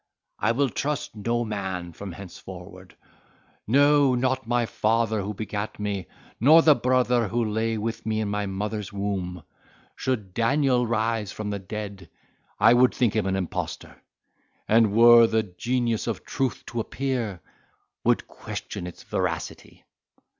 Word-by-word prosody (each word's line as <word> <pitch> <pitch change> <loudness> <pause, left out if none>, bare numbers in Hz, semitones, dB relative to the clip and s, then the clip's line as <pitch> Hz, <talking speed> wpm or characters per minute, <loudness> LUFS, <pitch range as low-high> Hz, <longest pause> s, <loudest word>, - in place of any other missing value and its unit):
I 115 - +2
will 135 +3 +1
trust 145 +3 -3
no 115 +3 -1
man 95 -5 -4
from 95 +1 -7
henceforward—no, 100 - -1
not 130 0 0
my 120 0 +2
father 110 -1 +1
who 105 +2 -4
begat 105 0 -4
me, 100 -3 -3 0.3
nor 155 +7 +7
the 155 - +7
brother 125 -3 +2
who 115 +3 0
lay 110 +1 -1
with 115 +2 -3
me 110 -1 -1
in 110 - -1
my 105 0 -2
mother's 105 +1 -4
womb: 95 -4 -3 0.5
should 110 -8 -3
Daniel 125 +1 +2
rise 110 -3 0
from 105 -1 -4
the 100 - -3
dead, 100 -2 -7 0.5
I - - +7
would 125 +1 +4
think 120 -4 +1
him 105 -3 +1
an 95 - 0
impostor; 95 -3 -4 0.7
and 110 -1 +4
were 115 +1 +8
the 110 0 +1
genius 115 +5 -1
of 115 - -3
truth 135 -3 -2
to 120 - -4
appear, 120 -5 -2 0.6
would - - +2
question 90 - -7
its 90 - -10
veracity!" - - -4
110 Hz, 140 wpm, -25 LUFS, 100-120 Hz, 0.7 s, were